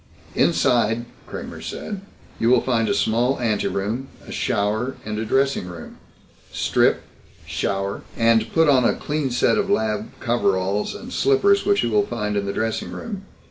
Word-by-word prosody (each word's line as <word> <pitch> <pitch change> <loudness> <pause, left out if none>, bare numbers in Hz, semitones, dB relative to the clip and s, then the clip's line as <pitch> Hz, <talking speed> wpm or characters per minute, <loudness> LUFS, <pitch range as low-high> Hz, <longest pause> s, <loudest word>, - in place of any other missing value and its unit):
"Inside," 120 -1 +2 0.2
Kramer 80 -1 -7
said, 190 - -5 0.4
"you 115 - +2
will 125 -1 +5
find 115 -4 +1
a - - +3
small 120 +4 +1
anteroom, 110 +1 -1 0.2
a - - -8
shower, 110 +6 0
and 105 0 -3
a 110 - -2
dressing 135 -4 +1
room. 85 -3 -9 0.5
Strip, - - +2 0.4
shower, 100 0 -2 0.2
and 115 -1 +3
put 160 -1 +4
on 135 -3 +5
a - - +3
clean 150 -2 -2
set 125 - +2
of 200 -1 -1
lab 110 - 0
coveralls 100 -4 0
and - - -8
slippers 200 +10 +3
which 200 -1 +3
you 120 - 0
will 105 -1 +2
find 105 -3 -2
in 100 -1 -1
the - - 0
dressing 110 +2 -2
room. 200 -4 -6
115 Hz, 160 wpm, -22 LUFS, 105-135 Hz, 0.5 s, will